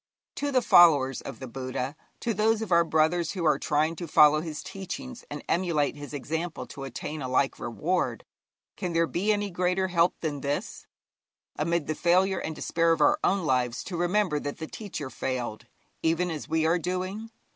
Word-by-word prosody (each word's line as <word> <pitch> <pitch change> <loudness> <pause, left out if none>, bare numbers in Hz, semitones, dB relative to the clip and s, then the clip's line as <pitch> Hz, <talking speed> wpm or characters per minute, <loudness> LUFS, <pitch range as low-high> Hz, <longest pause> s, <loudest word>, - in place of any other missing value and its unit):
To 285 0 -1
the 255 -2 +2
followers 145 - +6
of 135 - -8
the 130 - -6
Buddha, 130 +2 -4 0.3
to 235 - 0
those 220 +2 +2
of 205 - -7
our 170 0 +6
brothers 160 +1 +1
who 180 -4 -3
are 155 - +3
trying 155 +2 +1
to 175 - -5
follow 150 0 +6
his 160 -2 -6
teachings 240 +7 -7
and 145 0 -6
emulate 165 -6 +1
his 145 0 -9
example 160 +4 -4
to 135 -1 -8
attain 145 +4 -6
a 130 - -3
like 130 +1 +1
reward, 165 +10 -1 0.5
can 180 -3 -3
there 165 0 +3
be 190 +6 0
any 205 -1 0
greater 180 +1 0
help 170 0 +2
than 145 -4 -3
this: 140 +1 -3 0.7
amid 170 0 0
the 155 - -1
failure 185 +4 +2
and 160 - -4
despair 165 +1 +2
of - - -2
our 300 +1 +4
own 195 -3 +2
lives 125 -4 0
to 185 - -6
remember 175 -2 +1
that 145 0 -5
the 160 - -5
teacher 160 -7 -6
failed, 120 -3 -4 0.3
even 165 +2 +1
as 155 -3 -6
we 160 0 +1
are 165 +2 +3
doing? 185 +6 -3
165 Hz, 190 wpm, -27 LUFS, 145-185 Hz, 0.7 s, followers